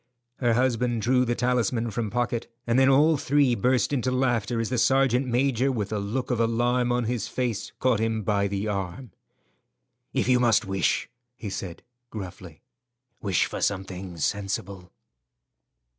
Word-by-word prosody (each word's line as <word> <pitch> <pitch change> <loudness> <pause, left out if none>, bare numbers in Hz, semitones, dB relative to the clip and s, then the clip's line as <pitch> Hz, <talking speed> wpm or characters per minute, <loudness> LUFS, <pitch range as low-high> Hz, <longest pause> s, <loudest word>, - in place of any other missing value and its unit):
Her 120 -3 +2
husband 120 -2 +1
drew 125 +1 +3
the 120 0 0
talisman 120 -1 0
from 110 0 -2
pocket, 120 0 -2
and 120 +2 +2
then 135 0 +5
all 150 +3 +5
three 140 -2 +2
burst 125 +5 +1
into 130 -2 0
laughter 120 -3 0
as 115 - -1
the 125 - +1
sergeant 135 0 +3
major, 130 +1 +1
with 110 -4 -3
a 105 - -1
look 115 +7 -3
of 120 - 0
alarm 120 +2 +1
on 120 0 +1
his 115 -2 -2
face, 120 -5 -3
caught 125 -4 +2
him 110 -1 -1
by 100 -1 +1
the 100 +1 -3
arm. 100 +4 -4 1.0
"If - - 0
you 125 -1 +4
must 120 -2 +3
wish," 95 0 0 0.3
he 110 -5 -6
said, 90 -3 -6 0.3
gruffly, 95 -4 -9 0.6
"wish 95 -5 +1
for - - -6
something 95 -2 -3
sensible." 95 +1 -3
120 Hz, 160 wpm, -26 LUFS, 100-125 Hz, 1.0 s, then